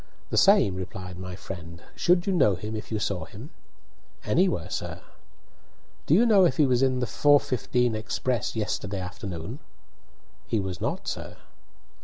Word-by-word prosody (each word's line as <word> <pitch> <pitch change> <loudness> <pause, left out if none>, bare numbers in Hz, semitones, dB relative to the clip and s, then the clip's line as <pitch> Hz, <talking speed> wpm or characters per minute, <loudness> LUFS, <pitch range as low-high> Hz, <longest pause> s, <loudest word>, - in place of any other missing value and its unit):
"The - - -1
same," 195 - +5
replied 90 -1 -7
my 90 -1 -6
friend. 85 -2 -9
"Should 175 0 +3
you 195 - +1
know 105 - +4
him 105 +5 -5
if 110 - -7
you 110 - 0
saw 100 -5 -2
him?" 115 +10 -11 0.7
"Anywhere, - - +1
sir." - - -5 1.0
"Do 155 - +5
you 225 +6 +5
know 210 -5 +6
if 130 -7 +3
he 150 - +5
was 125 -2 +2
in 130 -1 +2
the - - +1
4:15 125 -3 +2
express 115 +2 -2
yesterday 105 -2 -2
afternoon?" 95 - -6 0.9
"He 110 - 0
was 95 -2 -4
not, - - -2
sir." - - -5
110 Hz, 155 wpm, -26 LUFS, 95-135 Hz, 1.0 s, know